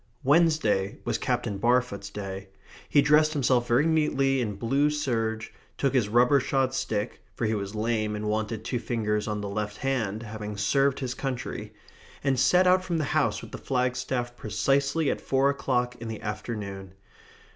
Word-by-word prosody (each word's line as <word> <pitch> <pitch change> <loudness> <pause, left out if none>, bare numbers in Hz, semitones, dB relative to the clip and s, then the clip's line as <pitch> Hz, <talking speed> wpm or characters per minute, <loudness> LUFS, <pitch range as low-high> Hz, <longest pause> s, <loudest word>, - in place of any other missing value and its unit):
Wednesday 140 - +3
was - - -1
Captain 120 -5 -1
Barfoot's 120 -2 +1
day. 95 -1 -6 0.4
He 145 - +5
dressed 155 +1 +4
himself 125 -4 +2
very 125 +6 +3
neatly 135 -4 +2
in 105 -4 -2
blue 135 +8 +1
serge, 115 -7 -2 0.2
took 135 -1 +1
his 120 -6 +2
rubber 125 +5 +5
shod 135 0 0
stick 105 -5 -2
for 120 - -1
he 110 - +1
was 100 0 -4
lame 110 -1 0
and 105 0 -3
wanted 110 +1 -2
two 120 0 -1
fingers 105 -3 -1
on 105 -1 -2
the 100 - -4
left 105 +1 -3
hand, 115 -6 -1
having 105 -1 -6
served 135 +7 +2
his 125 -2 -2
country 130 -2 -5 0.5
and 135 -2 +1
set 180 +7 +5
out 185 0 +4
from 175 -3 -1
the 155 - 0
house - - +1
with - - -10
the - - -7
flagstaff 125 -1 -1
precisely 140 +7 +1
at - - -4
four 135 +1 +2
o'clock 125 -3 -1
in 115 - -5
the 110 -1 -6
afternoon. 105 -3 -5
120 Hz, 170 wpm, -27 LUFS, 105-135 Hz, 0.5 s, He